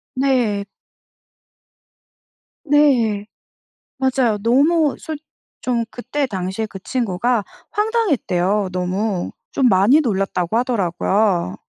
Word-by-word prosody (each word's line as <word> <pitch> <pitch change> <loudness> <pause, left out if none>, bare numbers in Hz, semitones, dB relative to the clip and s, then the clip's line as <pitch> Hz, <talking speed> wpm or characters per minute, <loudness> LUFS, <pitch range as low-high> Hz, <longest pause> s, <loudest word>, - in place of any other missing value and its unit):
네. 250 -7 +1 2.0
네 260 -9 +3 0.7
맞아요. 260 -5 +1
너무 290 +7 +3
솔 315 -3 -5 0.4
좀 235 -2 0
그때 280 +5 -3
당시에 190 0 -3
그 210 - -9
친구가 235 -1 0 0.3
황당했대요 275 - +1
너무. 185 +1 -2 0.2
좀 265 - +3
많이 205 +11 +5
놀랐다고 195 - -1
하더라고요. 195 - +1
230 Hz, 190 characters per minute, -20 LUFS, 195-270 Hz, 2.0 s, 많이